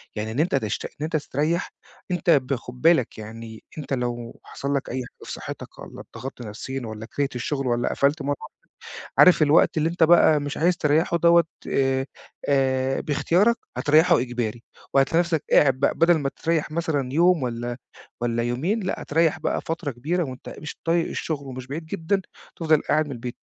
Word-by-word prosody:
يعني 110 +1 -3
إن 125 - -3
أنت 165 0 +2
تشت 110 -5 -2
إن - - -7
أنت 160 +2 -3
تستريح، 155 +3 -1 0.4
أنت 175 -1 -1
ب 140 -4 +4
خد 125 +1 -10
بالك، 160 -7 +3
يعني 110 +1 -9
أنْتَ 150 -2 -4
لو 120 -2 -3
حصل 140 +1 -4
لك 140 - -2
أي - - -4
حاجة 125 -1 -6
في - - -8
صحتك، - - -8
والّا - - -10
اضغطت 130 +2 -7
نفسيًا، 120 +4 -6
والّا 110 0 -7
كَرِهت 140 +3 -3
الشغل، 135 +2 -2
والّا 120 0 +1
قفلت 145 +2 +1
مرة 145 +1 -1
واحدة. - - -11 0.6
عارف 180 -3 +7
الوقت 155 +3 +4
اللي 155 +1 +2
أنت 170 +1 -3
بقى 160 -2 +6
مش 145 0 -4
عايز 175 +2 +2
تريحه 160 0 +2
دوَّه، 170 0 +5 0.2
آآ 135 0 +1 0.4
آآ 135 -1 +1
باختيارك 185 +10 +2 0.2
هاتريحه 160 +2 +4
إجباري، 120 -2 -3 0.3
وهاتلاقي 140 +4 +3
نفسك 170 -4 -1
قاعد 135 -3 +6
بقى. - - +2
بدل 170 +1 +4
ما 140 -2 -1
تريح 160 -2 +1
مثلًا 155 -6 -1
يوم 170 +1 +4
والّا 120 -1 -3 0.4
والّا 120 -1 0
يومين، 140 - -1
لأ، 185 - -3
هاتريح 160 +1 +1
بقى - - -1
فترة 165 -2 -3
كبيرة 155 +9 -1
وأنت 130 -2 -8
مش 150 - -7
طايق 165 0 +1
الشغل، 145 -3 -4
ومش 130 -1 -7
بعيد 155 +4 -6
جدًا 195 +3 -1 0.4
تفضل 160 -2 +3
قاعد 155 0 +1
من 145 - -6
البيت. 120 -1 -6
145 Hz, 185 wpm, -24 LUFS, 125-165 Hz, 0.6 s, عارف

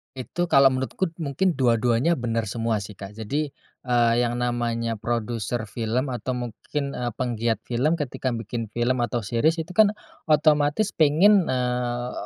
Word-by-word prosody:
Itu 130 +7 -3
kalau 135 0 +7
menurutku 130 +8 -1 0.2
mungkin 160 +5 0
dua-duanya 125 +5 +2
benar 115 -1 -1
semua 110 0 -2
sih 105 -1 -11
Kak, 100 +1 -9
Jadi, 140 +8 -2 0.4
eee, 120 -1 +3
yang 120 0 0
namanya 120 -2 -1
produser 120 0 -2
film 115 +5 -2
atau 125 +1 -3
mungkin, 130 +4 -4
eee, 120 -2 -3
penggiat 115 -2 -1
film 130 +7 +1
ketika 140 -4 -4
bikin 115 0 -4
film 120 +1 +1
atau 120 -1 -1
series 120 +10 +1
itu 165 - -12
kan, 215 +2 +4 0.3
otomatis 150 +5 +3
pengen, 170 +5 +4
eee, 125 -1 -1
125 Hz, 145 wpm, -24 LUFS, 115-145 Hz, 0.4 s, kalau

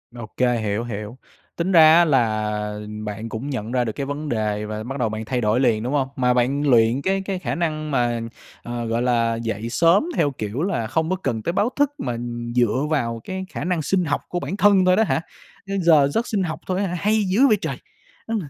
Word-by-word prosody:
Ô 120 -2 -7
kê, 125 -2 +2
hiểu, 110 +1 -2
hiểu. 105 +1 -6 0.4
Tính 175 +3 -1
ra 160 -2 +8
á 175 - +6
là 105 -6 0 0.3
bạn 110 +2 -5
cũng 115 +7 -5
nhận 120 -4 -4
ra 125 -1 +1
được 110 - -2
cái 140 +5 -4
vấn 145 +1 -4
đề, 105 -2 -1
và 110 0 -5
bắt 135 +3 -5
đầu 115 - +1
bạn 110 0 -5
thay 125 +1 -1
đổi 110 +3 +2
liền, 115 -4 +2
đúng 130 +4 -2
hông? 135 -2 +1
Mà 125 -1 +2
bạn 130 +4 +1
luyện 120 +2 +4
cái 195 +3 0
cái 190 -2 -3
khả - - -3
năng 155 -3 -2
mà, 120 -3 0 0.4
ờ, 120 -1 -4
gọi 115 +1 -1
là, 115 -2 +1
dậy 115 0 -4
sớm 170 - +3
theo 145 - +2
kiểu 110 +3 -4
là 120 - -1
không 160 +6 -1
có 185 - +1
cần 115 - -3
tới 170 - -1
báo 215 +5 +1
thức 290 -1 +3
mà 120 - -3 0.4
dựa 125 +4 +2
vào 115 -7 -1
cái 190 0 -5
khả - - -5
năng 175 -2 0
sinh 180 +4 0
học 145 - -1
của 175 - -2
bản 195 - -4
thân 200 -2 +5
thôi 185 0 +5
đó 220 - +4
hả? 165 - 0 0.5
Ơ, 195 - -4
giờ 155 -5 +5
giấc 225 +12 -1
sinh 200 -4 0
học 160 -3 -4
thôi 185 0 -1
á 200 - 0
hả? 175 - -4
Hay 215 +1 +2
dữ 205 +9 +3
vậy 215 - +4
trời! - - -3 0.5
Ư, 225 - -2
130 Hz, 240 wpm, -22 LUFS, 115-175 Hz, 0.5 s, ra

